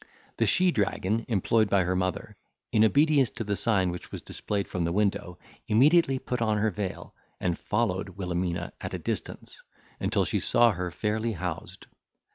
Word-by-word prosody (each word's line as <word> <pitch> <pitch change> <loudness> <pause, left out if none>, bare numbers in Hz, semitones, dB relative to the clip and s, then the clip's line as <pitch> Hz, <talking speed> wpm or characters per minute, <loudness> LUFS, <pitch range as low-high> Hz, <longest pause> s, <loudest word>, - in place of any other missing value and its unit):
The - - +2
she 185 0 +4
dragon 105 - 0
employed 110 0 +2
by 100 -2 +3
her 90 +1 0
mother, 90 0 -2 0.4
in 110 - +4
obedience 140 +2 +4
to 115 - -5
the 100 -1 -1
sign 95 -5 +2
which 90 - -8
was - - -7
displayed 100 -2 -3
from 90 - -2
the 85 - 0
window 95 -2 0 0.3
immediately 140 +5 +4
put 125 -1 -4
on 110 -2 +2
her 105 +1 +1
veil, 95 0 -5 0.3
and 90 -2 0
followed 95 -3 -2
Wilhelmina 90 -2 -2
at - - -4
a - - -2
distance, - - -4 0.4
until - - +1
she - - 0
saw 120 0 +4
her 90 -2 -3
fairly 110 +6 -1
housed. 90 0 -6
105 Hz, 170 wpm, -27 LUFS, 90-115 Hz, 0.4 s, she